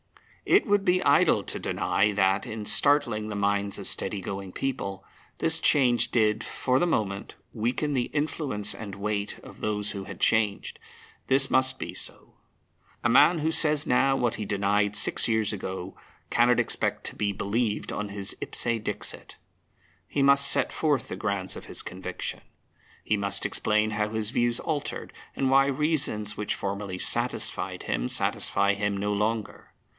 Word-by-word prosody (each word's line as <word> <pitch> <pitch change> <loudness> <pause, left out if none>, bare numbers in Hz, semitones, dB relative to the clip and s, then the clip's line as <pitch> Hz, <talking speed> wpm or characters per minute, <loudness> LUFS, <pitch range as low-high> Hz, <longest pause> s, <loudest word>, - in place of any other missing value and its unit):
It - - +5
would 205 -2 +2
be 185 -1 +2
idle - - +4
to - - -3
deny 105 +1 +1
that, 95 0 +1
in 110 -1 -6
startling 120 -6 +3
the 105 - -4
minds 100 0 0
of - - -7
steady 105 - -2
going 95 0 -6
people, 100 -6 -4 0.3
this 165 0 +3
change 125 -5 +3
did, 110 -1 +1
for 130 0 0
the 175 - +2
moment, 100 - -2 0.2
weaken 125 +7 -1
the 125 -3 +1
influence 145 -7 -1
and 100 -3 -8
weight 100 0 -3
of - - -13
those 105 -1 -1
who 100 -2 -6
had - - -9
changed. 110 -3 +1 0.5
This 135 0 +3
must 130 0 +3
be - - -6
so. - - -7 0.7
A - - +3
man 145 +7 +5
who 160 +2 0
says 150 -2 +2
now 135 +2 +3
what 120 -2 0
he 110 - -4
denied 100 +1 +1
six - - +2
years 110 -2 +1
ago 95 -2 -6 0.4
cannot 120 +1 +4
expect - - -1
to - - -3
be 105 -1 0
believed 105 +2 -2
on 105 0 -4
his 100 -1 -3
ipse - - 0 0.2
dixit. - - -4 0.7
He 140 - 0
must 140 0 +6
set - - +2
forth 150 -4 0
the - - -5
grounds 100 -3 -2
of - - -9
his - - -2
conviction. 90 0 -6 0.6
He 105 - +1
must 100 -1 -2
explain 105 0 +1
how 105 0 -1
his 110 0 -2
views 120 -1 +1
altered, 155 -4 -4 0.2
and 135 -1 0
why 135 0 +5
reasons 140 -8 0
which 105 - -2
formerly 100 -1 -4
satisfied - - -1
him - - -1
satisfy 100 +8 +2
him 100 0 -1
no 105 +1 -1
longer. 105 +1 -3
105 Hz, 165 wpm, -27 LUFS, 100-135 Hz, 0.7 s, must